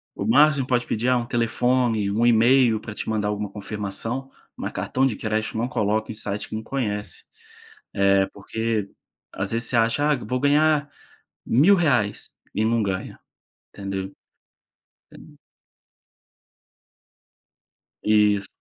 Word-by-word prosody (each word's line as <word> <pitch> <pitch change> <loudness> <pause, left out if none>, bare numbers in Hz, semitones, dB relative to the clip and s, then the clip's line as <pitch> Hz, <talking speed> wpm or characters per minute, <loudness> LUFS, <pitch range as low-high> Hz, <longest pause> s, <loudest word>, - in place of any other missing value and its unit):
O 100 - -4
máximo 140 +4 +4
que - - -19
pode 125 -1 +1
pedir, 115 +3 0
ah, 125 - +4
um 120 - -2
telefone, 120 -2 +1
um 115 +3 +1
email 120 0 +4
pra 110 0 -8
te - - -5
mandar 105 -2 0
alguma 105 -1 -2
confirmação, 105 +5 -4 0.2
mas - - -5
cartão 130 +1 0
de 130 -5 0
crédito 110 0 -2
não 115 +2 0
coloca 110 -2 -1
em - - -7
site 105 -1 -3
que - - -5
não 110 - -4
conhece, 105 -5 -3 0.7
eh, 100 0 +3
porque 110 0 -3 0.4
às 95 +1 -3
vezes 115 +1 -1
você - - -1
acha 115 +6 +2
"Ah - - +3
eu 125 - -8
vou 125 +4 -1
ganhar 150 +1 +3 0.6
R$1.000 155 - +5
reais" 125 - 0 0.3
e 105 - +1
não 115 0 +1
ganha, 95 -2 -4 0.5
entendeu? 95 -1 -5 1.1
É. - - -16 2.7
Isso. 105 -2 +3
110 Hz, 140 wpm, -23 LUFS, 105-125 Hz, 2.7 s, R$1.000